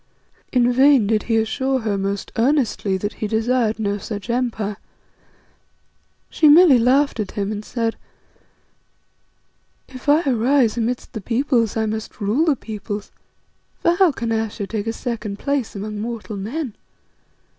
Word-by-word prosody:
In 245 -1 +3
vain 265 -2 +5
did 215 +1 +1
he 225 - +3
assure 260 +4 0
her 215 -2 -1
most 195 0 -3
earnestly 230 -6 +1
that 205 +2 -4
he 215 - 0
desired 225 +1 +1
no 205 -2 -1
such 205 +3 -5
empire. 225 -5 -2 1.5
She 310 - +4
merely 300 -4 +7
laughed 260 +2 +2
at 205 -3 -3
him 205 -1 -2
and 210 0 -4
said 230 0 -2 1.9
"If 260 +1 -7
I 300 +3 +5
arise 250 -2 +2
amidst 240 +2 -3
the 220 - -5
Peoples, 235 -1 0
I 220 - +1
must 220 0 -5
rule 215 +10 +1
the 305 -4 +3
Peoples, 210 -3 -6 0.7
for 340 - +2
how 350 -1 +4
can 230 -4 -4
Ayesha 220 -2 -2
take 215 +1 -4
a - - +1
second 225 -4 -4
place 280 -2 -2
among 210 +1 -5
mortal 225 -1 -5
men? 230 +6 -4
225 Hz, 145 wpm, -21 LUFS, 210-260 Hz, 1.9 s, merely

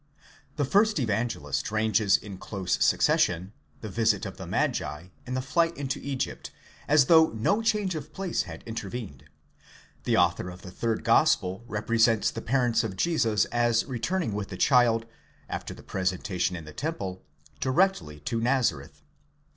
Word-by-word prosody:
The 145 - 0
first 210 +8 +3
Evangelist 110 - -1
ranges 110 -2 +3
in 100 -3 -10
close 95 -3 -1
succession 90 +3 +2 0.3
the 110 - -5
visit 110 +2 +1
of - - -7
the - - -8
magi 85 +5 -2 0.2
and 130 +1 -2
the 130 - -2
flight 165 +5 +1
into 135 -2 -3
Egypt, 135 -2 -4 0.4
as 150 -2 +5
though 160 +3 +6
no 160 - 0
change 210 -4 +1
of 155 -3 -6
place 190 -3 -2
had - - -9
intervened; 110 - -6 0.8
the - - +2
author 90 - +2
of 90 0 -11
the 90 - -9
third 115 +3 -2
Gospel 115 -5 +3
represents 115 +1 +2
the 115 - -6
parents 120 -2 +1
of 105 -4 -4
Jesus 115 - +2
as 120 -1 +2
returning 130 - -2
with 100 -1 -4
the 95 - -7
child, 115 0 +4 0.4
after - - -5
the - - -11
presenta 95 -1 -2
tion 90 +1 +1
in 85 -2 -7
the 75 - -10
temple, 100 - -4 0.4
directly 130 - +1
to 115 +9 -2
Nazareth. 120 - 0
115 Hz, 155 wpm, -27 LUFS, 95-135 Hz, 0.8 s, though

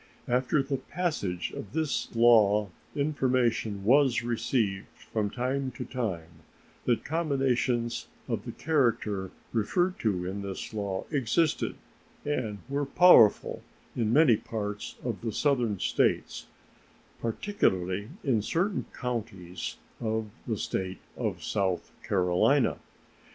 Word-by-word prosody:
After 130 +3 +2
the 135 0 -2
passage 130 - -2
of 100 - -8
this 160 -3 0
law 105 -3 +5 0.3
information 125 -8 +1
was 135 0 +4
received 115 -4 0 0.3
from 105 -2 +1
time 130 +4 -1
to - - -6
time 85 -10 -4 0.4
that 120 -2 +1
combinations 135 -6 0 0.2
of - - -2
the - - -4
character 115 - 0 0.2
referred 175 - +1
to 95 -5 0
in 95 +2 -4
this 100 +2 -6
law 100 -3 -3
existed 145 +3 +1 0.5
and 125 -8 -1
were 140 +1 -1
powerful 140 - +6 0.3
in 110 -3 0
many 140 -3 +6
parts 105 -2 -5
of 120 -4 -3
the 115 -1 -2
Southern 120 -5 +1
States, - - 0 0.7
particularly 100 - 0
in 120 -7 +2
certain 180 - 0
counties 110 -8 -4 0.3
in 110 -2 -2 0.2
the 110 -3 -1
State 95 -1 -3 0.2
of - - -3
South 95 -3 -1
Carolina. 95 +8 +2
115 Hz, 115 wpm, -29 LUFS, 100-135 Hz, 0.7 s, powerful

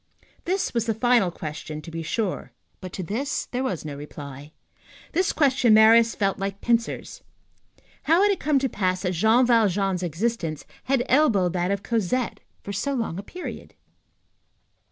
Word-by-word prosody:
This 375 +2 -1
was 235 -1 -1
the 225 - 0
final 235 -4 +3
question, 155 -2 -7
to 165 - -9
be 165 0 -4
sure; 190 +4 -3 0.3
but 185 -1 -8
to 185 - -4
this 255 - -2
there 255 +1 -3
was 185 -12 -3
no 145 -2 -5
reply. 145 0 -9 0.6
This 370 +3 +1
question 265 -6 +4
Marius 225 +1 +6
felt 195 -2 0
like 195 0 -3
pincers. 235 -1 -1 0.8
How 335 +5 +4
had 410 - +4
it 395 - -1
come 300 -2 +2
to 270 0 +1
pass 185 -5 -1
that 180 - 0
Jean 220 +8 +4
Valjean's 200 -6 +2
existence 175 -2 -2 0.2
had 265 -2 +1
elbowed 220 - +3
that 180 0 0
of 200 0 -1
Cosette 230 +2 -1 0.2
for 200 - -6
so 280 +8 -1
long 225 -8 -3
a - - -3
period? 355 - -8
215 Hz, 165 wpm, -24 LUFS, 180-250 Hz, 0.8 s, Marius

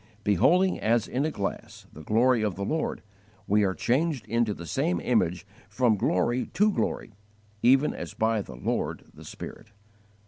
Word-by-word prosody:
"Beholding 180 - +3
as 115 0 +1
in 135 +4 -1
a - - +1
glass 100 -9 -5
the 80 - -10
glory 115 - +3
of 105 -4 -1
the 100 - -4
Lord, 160 +8 -2 0.4
we 105 +2 +3
are 95 -2 0
changed 135 - 0
into 115 +1 0
the 85 -4 -7
same 155 - 0
image 90 -6 0 0.2
from 115 +1 +2
glory 115 +6 0
to 210 +2 +4
glory, 155 - -2 0.5
even 135 +5 +4
as - - -7
by 110 -1 +1
the 65 -9 -10
Lord 60 - -2
the - - -13
Spirit." - - -9
115 Hz, 165 wpm, -27 LUFS, 100-135 Hz, 0.5 s, to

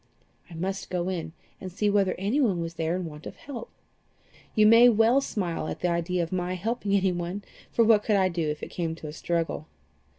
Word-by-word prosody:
I 170 - -10
must 190 +4 -3
go 180 0 -1
in, 170 -4 -3 0.3
and 185 - -7
see 205 +4 0
whether 200 -2 +2
anyone 205 -1 +1
was 165 0 -4
there 165 0 -1
in 185 -1 -3
want 150 -1 -8
of - - -8
help. 250 -5 -8 0.9
You 215 -2 +5
may 230 +3 +8
well 230 +4 +4
smile 175 - -3
at - - -5
the 180 - +1
idea 170 +1 0
of 165 - -6
my 180 0 -1
helping 210 +1 -1
anyone, 185 0 -1 0.3
for 230 - +3
what 215 -2 +5
could 210 0 +1
I 190 -1 +4
do 170 -4 -1
if 150 0 -4
it - - -6
came 165 -2 -2
to 160 - -9
a 150 - -7
struggle?" 165 -1 -2
185 Hz, 210 wpm, -27 LUFS, 170-210 Hz, 0.9 s, may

